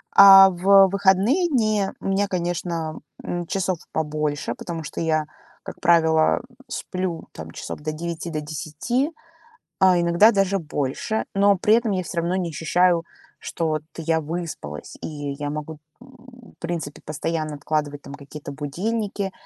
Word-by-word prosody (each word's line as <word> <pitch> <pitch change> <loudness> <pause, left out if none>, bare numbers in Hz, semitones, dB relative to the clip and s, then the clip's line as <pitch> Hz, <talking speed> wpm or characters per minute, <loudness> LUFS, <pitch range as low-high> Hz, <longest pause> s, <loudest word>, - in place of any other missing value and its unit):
А 195 -1 +10
в 195 +2 +6
выходные 200 - +3
дни 215 - +1
у - - -12
меня, 195 +1 +1
конечно, 170 -3 -3 0.2
м, 175 -1 -3
часов 185 -2 -1
побольше, 150 -2 -2
потому 165 -2 -6
что 145 - -5
я, 155 -1 +1 0.4
как - - -9
правило, 160 -1 +4 0.3
сплю, 185 -3 -4
там, 80 0 -9
часов - - -7
до 155 0 -3
9, 170 +1 -5
до 155 -2 -3
10, 155 - -2 0.7
а 185 -2 +5
иногда 170 +6 +5
даже 195 -1 +1
больше, 150 +7 -2
но 200 0 +4
при 215 +3 +3
этом 230 -2 +1
я 185 -1 -1
всё 175 0 -3
равно 170 +2 -1
не 175 -2 -2
ощущаю, 170 +2 +2 0.4
что 165 -2 -3
вот 155 -1 -1
я 160 0 0
выспалась, 155 - -6
и - - -4 0.3
я 145 0 -2
могу, 150 +1 -6 0.2
в 250 -2 -16
принципе, 165 -4 -5
постоянно 155 0 -3
откладывать 145 -1 -2
там 140 - -10
какие-то 145 0 -9
будильники 195 +7 -3
170 Hz, 150 wpm, -23 LUFS, 155-195 Hz, 0.7 s, А